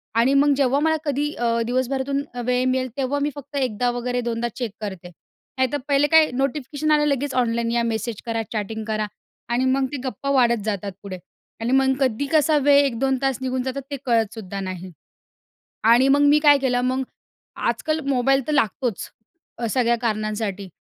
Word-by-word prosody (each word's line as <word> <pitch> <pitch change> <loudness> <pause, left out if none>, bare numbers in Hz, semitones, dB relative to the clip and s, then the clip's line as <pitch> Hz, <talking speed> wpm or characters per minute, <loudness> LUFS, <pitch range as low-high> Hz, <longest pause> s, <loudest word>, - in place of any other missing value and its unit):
आणि 235 +4 +3
मग 285 +1 +4
जेव्हा 275 0 +2
मला 315 +1 +2
कधी 290 +1 -1
अ, 235 -1 0
दिवसभरातून 265 +3 -1 0.2
वेळ 250 +1 +1
मिळेल, 255 0 0
तेव्हा 275 +1 -1
मी 290 - +1
फक्त 285 0 -10
1दा 250 -3 0
वगैरे 245 +1 -2
2दा 235 0 -2
चेक 240 -4 -3
करते. 190 -4 -6 0.5
नाहीतर 260 +2 +1
पहिले 285 0 +3
काय 320 -1 +6
नोटिफिकेशन 280 +3 -1
आलं, 300 0 +4
लगेच 280 -1 0
ऑनलाइन 235 -2 0
या, 235 0 +1
मेसेज 225 -1 -3
करा, 230 -1 -1
चॅटिंग 220 0 -3
करा 215 -1 -1 0.4
आणि 245 +2 +1
मग 265 +1 +2
ते 290 - -3
गप्पा 260 +1 -4
वाढत 240 -4 +3
जातात 205 -2 -2
पुढे 190 -2 -6 0.4
आणि 230 +2 -1
मग 265 0 +4
कधी 265 0 0
कसा 310 -1 +4
वेळ 285 0 +5
एक 250 -4 -2
दोन 265 0 +1
तास 270 -3 0
निघून 260 -1 -2
जातात 260 +2 -3
ते 280 - -2
कळतसुद्धा 220 -4 -1
नाही. 185 -1 -6 0.9
आणि 240 +4 +5
मग 280 +1 +4
मी 290 +1 +5
काय 295 -2 +6
केलं, 255 -2 +1
मग 255 +1 0 0.7
आजकाल 310 0 -1
मोबाईल 270 0 +2
तर - - 0
लागतोच 230 -3 -1 0.5
अ, 235 - -3
सगळ्या 235 -1 +2
कारणांसाठी 215 -3 -2
255 Hz, 180 wpm, -22 LUFS, 230-275 Hz, 0.9 s, काय